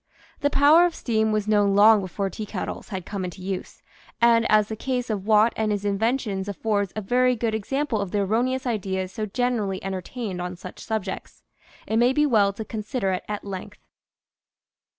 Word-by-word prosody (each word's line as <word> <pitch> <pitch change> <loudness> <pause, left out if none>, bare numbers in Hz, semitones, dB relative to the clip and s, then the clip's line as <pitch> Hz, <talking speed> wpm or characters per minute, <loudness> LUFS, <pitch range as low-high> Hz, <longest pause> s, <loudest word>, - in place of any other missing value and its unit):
The 285 - +2
power 300 +5 +6
of 340 - -6
steam 220 -2 0
was 215 -1 0
known 205 -2 +3
long 210 +1 +7
before 195 +1 -3
teakettles 210 +2 -5
had 190 -5 -5
come 200 -2 -4
into 180 0 -6
use; 190 0 -5 0.4
and 235 -1 +4
as 215 -1 +5
the 220 - -4
case 250 0 -2
of 200 -1 -4
Watt 215 +1 +5
and 220 -1 0
his 205 -1 -1
inven 220 +6 +1
tions 195 -5 -4
affords 200 -1 -1
a 215 - -2
very 250 +5 +2
good 225 -1 -1
example 235 +2 -1
of 200 - -3
the 205 +2 0
erroneous 245 +6 0
ideas 190 -5 -2
so 215 +1 -4
generally 215 -4 -1
entertained 195 +1 -4
on 180 0 -4
such 180 - -10
subjects, 205 -4 -5 0.4
it 220 - -1
may 245 +2 +4
be 300 +2 +3
well 210 -7 +3
to 215 +2 -7
consider 215 -1 -2
it 185 - -2
at 210 -1 -5
length. 190 -2 -7
215 Hz, 190 wpm, -24 LUFS, 195-235 Hz, 0.4 s, long